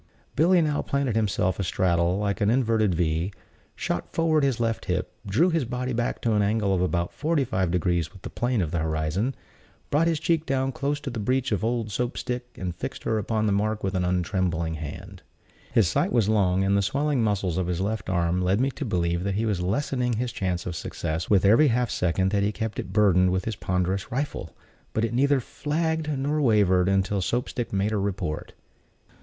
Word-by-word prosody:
Billy 175 +5 +4
now 150 -2 0
planted 140 -5 -1
himself 100 -4 0
astraddle, 90 -1 +1
like 100 0 -1
an 100 - +3
inverted 110 -6 +2
V; 85 +2 0 0.4
shot - - -3
forward 160 -2 +2
his 135 -4 +1
left 115 -1 -1
hip, - - -2
drew 150 - +3
his 165 -3 +1
body 125 +1 -3
back 120 +1 -1
to 115 - +1
an 105 - +3
angle 100 -1 +1
of 90 - +1
about 85 -1 0
forty 155 -1 +1
five 95 -7 -1
degrees 85 -2 0
with 95 -1 -16
the 120 - -5
plane 120 -4 0
of 80 - -4
the 85 - 0
horizon, 80 - -1 0.6
brought 155 +3 +3
his 165 -2 +1
cheek 160 0 +1
down 135 -1 0
close 145 +2 -2
to 145 -3 -5
the 115 - -4
breech 130 +4 0
of 105 -2 0
old 115 -2 -1
Soap 120 +4 -2
stick, 125 -1 -3
and 90 -2 -4
fixed - - -6
her 110 - 0
upon 110 +1 -1
the 105 - +2
mark 105 +2 0
with 95 0 -1
untrembling 90 -2 0
hand. 75 -1 -8 0.5
His 110 -6 +4
sight 80 - +1
was 115 -5 +2
long, 95 -3 +2
and 100 +1 +2
the 100 - +3
swelling 140 +6 0
muscles 95 -5 0
of 90 - -1
his 90 -1 -1
left 100 0 -2
arm 90 0 +1
led 95 +3 +2
me 135 +2 +1
to 145 - -6
believe 85 -6 0
that 100 0 -1
he 110 +3 0
was 100 -5 0
lessening 125 +5 0
his 120 +2 -1
chance 90 -4 -2
of 90 - -4
success 80 +1 -4
with 100 -2 +4
every 115 +10 +6
half 125 -1 +1
second 95 +2 +1
that 100 -1 +2
he 100 +1 +1
kept 110 0 -4
it - - -5
burdened 95 -3 +4
with 95 0 -1
his 115 - -2
ponderous 95 +1 -1
rifle; 140 +4 -3 0.4
but 110 - +1
it 115 - -4
neither 140 +2 +3
flagged 155 +4 -2
nor 145 +1 0
wavered 100 -7 +3
until 95 0 +1
Soap 120 +8 -1
stick 120 - -4
made 100 +2 0
her 105 -2 0
report. 95 -6 -3
105 Hz, 210 wpm, -26 LUFS, 90-125 Hz, 0.6 s, every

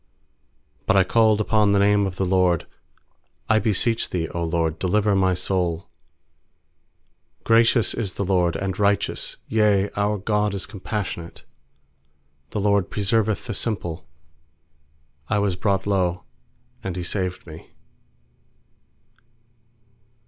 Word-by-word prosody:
4But - - +3
I 95 - +6
called 110 +2 +3
upon 105 -1 +2
the - - +3
name 100 0 +3
of 95 -1 -7
th* 95 - 0
LORD: 90 -3 +2 0.8
'I 110 - +4
beseech 110 +2 +1
Thee, 85 -3 -2
0 85 +1 -3
LORD, 80 -1 -1
delivei 100 +2 +1
my 95 -1 +2
soul.7 90 -2 -8
6Gracious 115 0 +4
is 105 -6 -3
the 100 - -2
LORD, 90 -2 +1
and 95 -1 -3
righteous 100 0 0
Yea, 105 -2 +2
our 105 +1 0
God 105 0 0
is 95 - -3
compassionate 95 -4 -6 1.1
6The 105 - -3
LORD 100 -3 +2
preserveth 105 +1 0
the 115 - -4
simple; 85 -7 -3 1.2
I 105 - +1
was 100 -3 0
brought 95 0 0
low, 90 -3 0 0.6
and 95 -3 -4
He 90 - -4
saved 90 0 -2
me. 80 -1 -12
100 Hz, 120 wpm, -23 LUFS, 90-105 Hz, 1.2 s, I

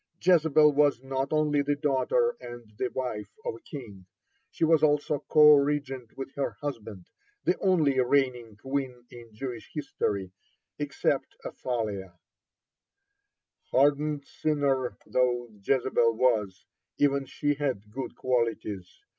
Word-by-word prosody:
(50) 185 0 +2
Jezebel 155 -3 +5
was 145 -3 +3
not 135 0 -2
only 150 -2 +2
the 145 +1 0
daughter 150 - +1
and 120 -2 -10
the 130 - +1
wife 125 -5 -4 0.2
of 480 - -1
a 400 - -11
king, 115 - -10 0.4
she 165 - 0
was 160 -1 +4
also 150 -1 +1
co 150 -1 +8
regent 140 -4 0
with 135 0 -6
her 140 - -2
husband, 110 -10 -6 0.4
the 180 - +2
only 155 -8 +2
reigning 125 -4 +1
queen 130 +1 -4
in 120 -2 -12
Jewish 120 +1 -7
history 100 - -3 0.5
except - - -1
Athaliah. 105 -7 -4 1.5
(51) - - -37
Hardened 145 +1 +2
sinner 140 -5 -1
though 120 -1 0
Jezebel 120 -1 +2
was, 110 -6 +1 0.3
even 140 -1 +2
she 145 -1 0
had 130 -8 -3
good 130 +3 -6
qualities. 115 - -2
135 Hz, 130 wpm, -28 LUFS, 120-145 Hz, 1.5 s, co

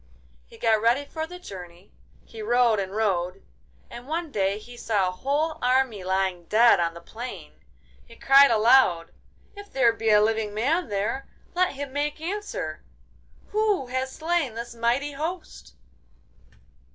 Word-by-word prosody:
He - - -16
got 220 -2 +2
ready 240 +5 +2
for 315 +2 -5
the 360 +2 -9
journey, 180 - -11 0.3
he 225 - -10
rode 235 0 +3
and 195 0 -4
rode, 190 -3 -1 0.4
and 240 +2 -11
one 325 0 -3
day 195 -3 0
he 240 +3 -12
saw 205 -6 0
a - - -4
whole 290 - -1
army 250 -5 +1
lying 190 -2 -1
dead 230 +2 +5
on 170 -1 -1
the 170 - -10
plain. 240 +8 -9 0.4
He 230 - -16
cried 275 +3 +6
aloud, 220 -7 +4 0.4
'If 405 0 -11
there 245 -4 +3
be 225 -1 -2
a 210 -1 +6
living 215 -1 0
man 285 +7 0
there, 205 +7 -2 0.3
let 365 +1 +1
him 275 -1 -6
make 295 +2 -2
answer! 330 - -5 0.7
Who 420 -7 +1
has 260 +1 -2
slain 320 -6 -1
this 235 +1 -6
mighty 240 +5 0
host? 320 +6 -6
235 Hz, 150 wpm, -25 LUFS, 205-285 Hz, 0.7 s, cried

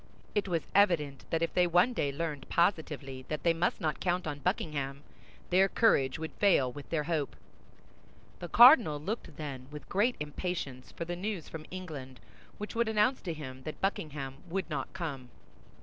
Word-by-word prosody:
It 205 -1 0
was 170 -4 -1
evident 165 -9 +3
that 165 0 0
if 165 - -1
they 180 -1 +4
one 180 +8 +4
day 145 -11 0
learned 150 -2 -4
positively 150 -7 0
that 155 -2 -4
they 170 - +4
must 170 +2 0
not 155 -2 -1
count 180 0 0
on 145 -2 -4
Buckingham, 140 -1 -2 0.5
their 190 +2 +5
courage 140 - +3
would 160 0 -5
fail 160 -11 +4
with 145 +3 -10
their 160 -3 0
hope. 155 -3 -1 1.0
The 175 - -5
cardinal 235 - +8
looked, 205 +10 -5
then, 135 -4 -6
with 150 0 -9
great 215 +6 +2
impatience 150 -4 -4
for 170 - -5
the 175 +1 -3
news 190 -2 -4
from 160 -1 -8
England 150 -9 -7 0.4
which 210 - -6
would 235 -1 +1
announce 220 +4 +2
to 170 - -3
him 130 -4 -8
that 155 +3 -7
Buckingham 150 -8 -2
would 190 +3 -2
not 135 -3 -3
come. 145 -9 -5
160 Hz, 175 wpm, -31 LUFS, 140-185 Hz, 1.0 s, cardinal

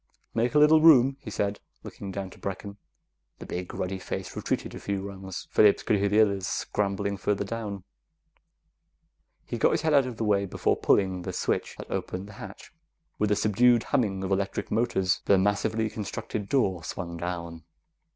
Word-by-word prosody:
"Make 120 +5 0
a - - +6
little 155 +1 +6
room," 135 -4 +7
he 120 - -8
said, 100 -1 -2 0.2
looking 100 - -8
down 95 -1 -5
to - - -15
Brecken. 100 +1 -6 0.6
The - - -9
big, 90 0 -5
ruddy 95 +1 -3
face - - -5
retreated - - -2
a - - -7
few 100 -1 -3
rungs. 95 -1 -7
Phillips 105 -2 +5
could 105 - +2
hear 100 +1 +1
the 105 +2 +5
others 100 -3 +1
scrambling 100 0 -1
further 100 +1 0
down. 105 -3 -5 1.6
He - - -4
got - - +4
his - - 0
head 160 -1 +2
out 140 -3 +5
of 120 -3 -6
the 115 - -2
way 100 -2 +2
before - - +1
pulling 95 -2 +2
the - - -4
switch - - -1
that - - -9
opened 95 +2 -3
the 105 - -11
hatch. 100 -1 -10 0.5
With 105 - +2
a 105 - +3
subdued 120 +3 +4
humming 95 -6 0
of 95 - -3
electric 95 0 -1
motors, 105 -5 +1
the 100 - +5
massively 105 +3 +1
constructed 105 0 -5
door 95 -11 +1
swung 85 -1 -5
down. 85 -1 -5
100 Hz, 180 wpm, -27 LUFS, 95-110 Hz, 1.6 s, room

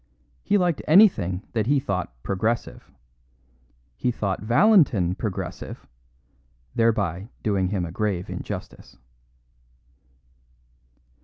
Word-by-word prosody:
He 205 - +2
liked 175 -6 +1
anything 115 - +4
that 110 -2 0
he 140 +1 +3
thought 95 - -3
"progressive." 110 +5 -2 1.1
He 125 - -1
thought 100 -5 -2
Valentin 120 - +4
"progressive," 95 0 -5 0.9
thereby 100 -4 0
doing 100 -3 +1
him 95 -2 -2
a 85 - -7
grave 95 -1 -2
injustice. - - -7
105 Hz, 90 wpm, -24 LUFS, 95-125 Hz, 1.1 s, anything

